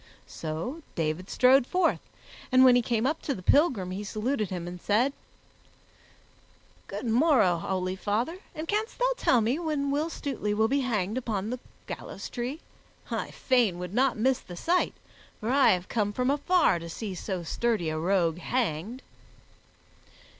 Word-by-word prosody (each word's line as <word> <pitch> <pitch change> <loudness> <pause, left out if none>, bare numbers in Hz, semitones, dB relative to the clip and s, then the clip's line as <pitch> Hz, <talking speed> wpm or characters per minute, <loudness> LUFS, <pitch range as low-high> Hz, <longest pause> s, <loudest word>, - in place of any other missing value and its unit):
So 165 - -5
David 165 +3 -2
strode 255 0 +5
forth, 360 -2 +2 0.5
and 255 +1 +7
when 250 -1 +7
he 245 - +4
came 230 0 0
up 305 +4 0
to 280 - -2
the 185 - -9
pilgrim, 235 - +3
he 195 +3 -4
saluted 215 +1 -2
him 175 -2 -4
and 175 0 -7
said, 240 +7 +2 1.7
"Good 205 +5 -5
morrow, 230 - +4
holy 185 +2 -2
father, 225 - -2 0.2
and 315 +1 -5
canst 425 +4 -1
thou - - +2
tell 250 - +3
me 240 +8 0
when 300 -4 -1
Will 300 +3 0
Stutely 255 -10 -3
will 220 +1 +3
be 275 +4 +1
hanged 220 -3 -1
upon 215 -3 -3
the 250 - -3 0.3
gallows - - -7
tree? 255 +6 -4 0.5
I - - -2
fain 240 -9 +1
would 180 +1 -6
not 260 +1 +2
miss 255 +4 +2
the 175 - -11
sight, 355 - +1 0.4
for 225 +2 -2
I 275 0 +5
have 180 0 -3
come 205 -3 -1
from 250 +4 +1
afar 295 - +3
to 170 0 -8
see 200 +3 -5
so 185 0 -4
sturdy 215 -1 0
a 155 0 -2
rogue 175 -1 +1
hanged." 230 - -2
230 Hz, 165 wpm, -28 LUFS, 185-270 Hz, 1.7 s, and